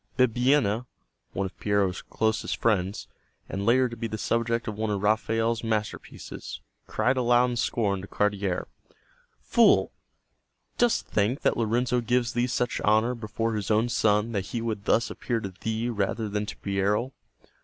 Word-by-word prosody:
Bibbiena, 125 Hz, -2 st, +2 dB, 0.5 s
one 100 Hz, -, -1 dB
of 95 Hz, -, -7 dB
Piero's 100 Hz, -3 st, +1 dB
closest 110 Hz, +1 st, -1 dB
friends, 100 Hz, -4 st, 0 dB, 0.4 s
and 100 Hz, +2 st, -4 dB
later 130 Hz, +2 st, +4 dB
to 120 Hz, -, -7 dB
be 115 Hz, 0 st, -3 dB
the 110 Hz, -, -4 dB
subject 115 Hz, +2 st, 0 dB
of 110 Hz, -, -3 dB
one 110 Hz, +1 st, -2 dB
of 100 Hz, -1 st, -2 dB
Raphael's 115 Hz, +2 st, +1 dB
masterpieces, 110 Hz, -1 st, -4 dB, 0.3 s
cried 125 Hz, +5 st, +1 dB
aloud 125 Hz, 0 st, +3 dB
in -, -, -2 dB
scorn 105 Hz, -5 st, 0 dB
to 95 Hz, -, -9 dB
Cardiere: 100 Hz, -3 st, -1 dB, 0.8 s
"Fool! -, -, +4 dB, 0.9 s
Dost 240 Hz, -1 st, +2 dB
think 110 Hz, +6 st, 0 dB
that -, -, +2 dB
Lorenzo 120 Hz, +2 st, +1 dB
gives 120 Hz, 0 st, 0 dB
thee 120 Hz, +1 st, +1 dB
such 120 Hz, -1 st, -1 dB
honor 110 Hz, +4 st, +3 dB
before 115 Hz, 0 st, -3 dB
his 105 Hz, -3 st, -3 dB
own 110 Hz, +2 st, +2 dB
son 105 Hz, -1 st, +2 dB
that 100 Hz, -3 st, -2 dB
he 120 Hz, -, -3 dB
would 110 Hz, -3 st, -3 dB
thus 115 Hz, -, +2 dB
appear 120 Hz, -2 st, -2 dB
to 100 Hz, -3 st, -6 dB
thee 110 Hz, +1 st, -1 dB
rather 110 Hz, -1 st, -1 dB
than 105 Hz, 0 st, -2 dB
to -, -, -7 dB
Piero?" 100 Hz, +6 st, 0 dB
110 Hz, 160 wpm, -27 LUFS, 105-120 Hz, 0.9 s, later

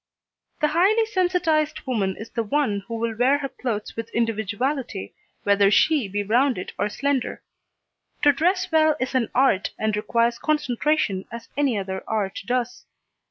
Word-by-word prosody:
The 300 Hz, -, +3 dB
highly 395 Hz, +8 st, +3 dB
sensitised 355 Hz, -6 st, 0 dB
woman 205 Hz, -8 st, -1 dB
is 220 Hz, -, -9 dB
the 230 Hz, -, -1 dB
one 225 Hz, -2 st, 0 dB
who 230 Hz, -, -4 dB
will 230 Hz, 0 st, -2 dB
wear 255 Hz, +5 st, +3 dB
her 275 Hz, -1 st, -4 dB
clothes 225 Hz, -6 st, -4 dB
with 230 Hz, 0 st, -5 dB
individuality, 230 Hz, -, -2 dB, 0.3 s
whether 200 Hz, -1 st, +4 dB
she 285 Hz, +3 st, +3 dB
be 205 Hz, +1 st, -2 dB
rounded 240 Hz, 0 st, +1 dB
or -, -, +1 dB
slender. 275 Hz, +3 st, -2 dB, 0.8 s
To 290 Hz, -, +7 dB
dress 360 Hz, +5 st, +1 dB
well 315 Hz, -1 st, +4 dB
is 255 Hz, +1 st, -2 dB
an 250 Hz, -4 st, +1 dB
art, 255 Hz, -7 st, +3 dB
and 215 Hz, -1 st, 0 dB
requires 235 Hz, +2 st, +1 dB
concentration 295 Hz, -8 st, 0 dB
as 230 Hz, 0 st, -8 dB
any 280 Hz, -6 st, +1 dB
other 190 Hz, -1 st, -4 dB
art 205 Hz, -3 st, -2 dB
does. 245 Hz, -1 st, -2 dB
245 Hz, 155 wpm, -24 LUFS, 210-295 Hz, 0.8 s, To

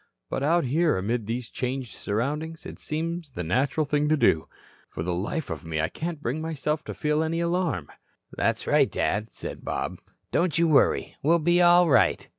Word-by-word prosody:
But -, -, -1 dB
out 165 Hz, +5 st, +3 dB
here, 155 Hz, -, +2 dB
amid 110 Hz, +3 st, -2 dB
these 120 Hz, +1 st, -3 dB
changed 130 Hz, -1 st, -4 dB
surroundings, 150 Hz, +10 st, -3 dB
it -, -, -8 dB
seems 165 Hz, +1 st, -3 dB
the 90 Hz, -9 st, -5 dB
natural 130 Hz, -, +1 dB
thing 150 Hz, +1 st, +1 dB
to 155 Hz, -, +3 dB
do. 80 Hz, -, +3 dB, 0.4 s
For 80 Hz, -, -5 dB
the 90 Hz, +1 st, -1 dB
life 100 Hz, -, -3 dB
of 80 Hz, -2 st, -5 dB
me 80 Hz, -1 st, -3 dB
I 80 Hz, -, +1 dB
can't 160 Hz, -2 st, -5 dB
bring 135 Hz, +7 st, -2 dB
myself 155 Hz, -1 st, -2 dB
to -, -, -6 dB
feel 150 Hz, 0 st, +1 dB
any 160 Hz, +1 st, -1 dB
alarm." 170 Hz, -, 0 dB, 0.5 s
"That's -, -, 0 dB
right, -, -, +3 dB
Dad," 110 Hz, +2 st, -1 dB
said -, -, -7 dB
Bob. -, -, -3 dB, 0.3 s
"Don't 170 Hz, -2 st, +1 dB
you 170 Hz, 0 st, +4 dB
worry. 155 Hz, -3 st, +3 dB
We'll 165 Hz, +4 st, +4 dB
be 175 Hz, +2 st, +3 dB
all 175 Hz, 0 st, +6 dB
right." 145 Hz, -, +3 dB
150 Hz, 190 wpm, -26 LUFS, 115-165 Hz, 0.5 s, all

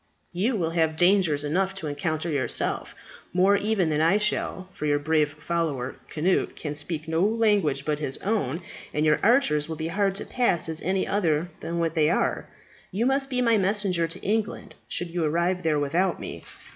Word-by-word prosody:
You 215 Hz, +8 st, 0 dB
will 165 Hz, -5 st, -1 dB
have 160 Hz, -2 st, +1 dB
dangers 175 Hz, -5 st, +3 dB
enough 190 Hz, +6 st, 0 dB
to 195 Hz, -, -5 dB
encounter 155 Hz, +2 st, -2 dB
yourself, 140 Hz, -7 st, -1 dB, 0.4 s
more 190 Hz, +3 st, +4 dB
even 200 Hz, -4 st, +1 dB
than 150 Hz, 0 st, +1 dB
I 165 Hz, +5 st, +4 dB
shall, 210 Hz, -3 st, -1 dB
for 150 Hz, -, -4 dB
your 145 Hz, 0 st, +3 dB
brave 150 Hz, 0 st, +1 dB
follower, 155 Hz, -5 st, -2 dB, 0.2 s
Cnut, 175 Hz, +5 st, 0 dB
can 150 Hz, -2 st, -5 dB
speak 150 Hz, +1 st, -5 dB
no 160 Hz, +1 st, 0 dB
language 205 Hz, -10 st, +2 dB
but 150 Hz, -1 st, -1 dB
his 135 Hz, -3 st, -3 dB
own, 175 Hz, -, -1 dB, 0.3 s
and 150 Hz, +1 st, +1 dB
your 155 Hz, -, +3 dB
archers 165 Hz, -, +3 dB
will 160 Hz, -, -3 dB
be 160 Hz, +1 st, -4 dB
hard 195 Hz, +2 st, 0 dB
to 205 Hz, -, -3 dB
pass 235 Hz, -11 st, +2 dB
as 160 Hz, -1 st, -2 dB
any 185 Hz, +2 st, 0 dB
other 170 Hz, -4 st, 0 dB
than 170 Hz, +1 st, -4 dB
what 165 Hz, -1 st, 0 dB
they 155 Hz, -2 st, +3 dB
are. -, -, 0 dB, 0.4 s
You 215 Hz, +6 st, -1 dB
must 270 Hz, +1 st, +1 dB
be 250 Hz, -1 st, 0 dB
my 230 Hz, -3 st, +4 dB
messenger 190 Hz, -3 st, +1 dB
to 165 Hz, -, -8 dB
England, 215 Hz, +1 st, -2 dB
should 175 Hz, -1 st, -3 dB
you 175 Hz, -1 st, -1 dB
arrive 170 Hz, +4 st, +1 dB
there 160 Hz, -3 st, +1 dB
without 170 Hz, +6 st, 0 dB
me. -, -, -8 dB
170 Hz, 190 wpm, -26 LUFS, 155-195 Hz, 0.4 s, more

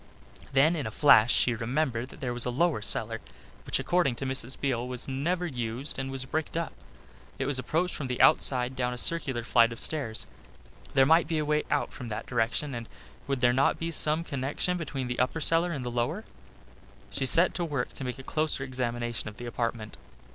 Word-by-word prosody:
Then 140 Hz, +5 st, +4 dB
in 145 Hz, -8 st, -3 dB
a -, -, -3 dB
flash 115 Hz, -1 st, +6 dB
she 125 Hz, -, +4 dB
remembered 125 Hz, +1 st, -1 dB
that -, -, -14 dB
there 125 Hz, -3 st, -2 dB
was 120 Hz, 0 st, +3 dB
a -, -, +1 dB
lower 150 Hz, 0 st, +1 dB
cellar, 115 Hz, +1 st, +2 dB, 0.5 s
which -, -, +2 dB
according 175 Hz, -8 st, +1 dB
to 135 Hz, -, -5 dB
Mrs. 130 Hz, -1 st, -1 dB
Beale 125 Hz, -3 st, -1 dB
was 125 Hz, 0 st, -2 dB
never 170 Hz, +7 st, -1 dB
used 125 Hz, -1 st, -3 dB
and 135 Hz, 0 st, -3 dB
was 135 Hz, -1 st, -3 dB
bricked 160 Hz, +4 st, -3 dB
up. 170 Hz, -, -3 dB, 0.6 s
It 135 Hz, -, -2 dB
was 135 Hz, -1 st, +2 dB
approached 165 Hz, +8 st, 0 dB
from 140 Hz, -, -4 dB
the 125 Hz, -1 st, -3 dB
outside, 125 Hz, -1 st, +4 dB
down 125 Hz, -1 st, -1 dB
a -, -, -6 dB
circular 135 Hz, -5 st, 0 dB
flight 115 Hz, -1 st, +4 dB
of 115 Hz, -, -6 dB
stairs. 135 Hz, -8 st, -1 dB, 0.7 s
There 135 Hz, -1 st, +6 dB
might 160 Hz, +4 st, +4 dB
be 165 Hz, -, -1 dB
a 155 Hz, -, 0 dB
way 150 Hz, 0 st, +1 dB
out 145 Hz, -, 0 dB
from 125 Hz, -, -8 dB
that 110 Hz, 0 st, -5 dB
direction 120 Hz, +4 st, -1 dB
and 115 Hz, -1 st, -6 dB, 0.4 s
would 135 Hz, -2 st, -1 dB
there 120 Hz, -1 st, +4 dB
not 135 Hz, +2 st, +2 dB
be 165 Hz, 0 st, -3 dB
some 155 Hz, 0 st, +3 dB
connection 145 Hz, +4 st, -1 dB
between 145 Hz, -6 st, -4 dB
the 125 Hz, 0 st, -3 dB
upper 130 Hz, +6 st, 0 dB
cellar 165 Hz, +3 st, +2 dB
and 135 Hz, -6 st, -4 dB
the 120 Hz, -, -3 dB
lower! 125 Hz, -, -1 dB, 0.9 s
She 135 Hz, -, 0 dB
set 170 Hz, +7 st, +4 dB
to 175 Hz, -, -2 dB
work 145 Hz, -7 st, -3 dB
to -, -, -8 dB
make 125 Hz, 0 st, -4 dB
a 135 Hz, -, -10 dB
closer 155 Hz, -1 st, 0 dB
examination 120 Hz, -3 st, -3 dB
of 105 Hz, -, -14 dB
the 120 Hz, -, -7 dB
apartment. 115 Hz, -2 st, -3 dB
130 Hz, 210 wpm, -28 LUFS, 120-150 Hz, 0.9 s, flash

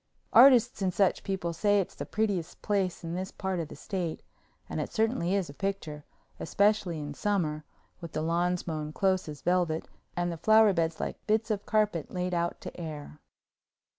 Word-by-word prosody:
Artists 245 Hz, -4 st, +7 dB
and 190 Hz, -1 st, +1 dB
such 195 Hz, +1 st, +2 dB
people 185 Hz, -3 st, -2 dB
say 205 Hz, +4 st, +3 dB
it's 190 Hz, -, -2 dB
the -, -, -7 dB
prettiest 200 Hz, -6 st, -2 dB
place 195 Hz, -5 st, 0 dB
in 165 Hz, 0 st, -4 dB
this 185 Hz, +2 st, -3 dB
part 190 Hz, -2 st, -3 dB
of 165 Hz, -, -3 dB
the -, -, -10 dB
State, 180 Hz, -5 st, -4 dB, 0.4 s
and -, -, -3 dB
it -, -, -5 dB
certainly 220 Hz, -5 st, +1 dB
is 195 Hz, -4 st, 0 dB
a 140 Hz, -, -9 dB
picture, 160 Hz, -5 st, -4 dB, 0.3 s
especially 200 Hz, -1 st, +1 dB
in 145 Hz, -1 st, -5 dB
summer, 155 Hz, -5 st, -1 dB, 0.4 s
with 170 Hz, -2 st, -8 dB
the 155 Hz, -, -1 dB
lawns 175 Hz, +2 st, 0 dB
mown 155 Hz, -2 st, -3 dB
close 190 Hz, -3 st, +1 dB
as 150 Hz, -2 st, -9 dB
velvet 175 Hz, -3 st, +1 dB, 0.3 s
and 175 Hz, 0 st, 0 dB
the 170 Hz, -, -5 dB
flower 220 Hz, +3 st, +5 dB
beds 165 Hz, -2 st, 0 dB
like -, -, -4 dB
bits 220 Hz, +1 st, +1 dB
of 205 Hz, -1 st, -3 dB
carpet 210 Hz, -7 st, +1 dB
laid 180 Hz, 0 st, -2 dB
out 170 Hz, 0 st, -1 dB
to -, -, -8 dB
air. 150 Hz, -2 st, -7 dB
180 Hz, 185 wpm, -29 LUFS, 165-200 Hz, 0.4 s, Artists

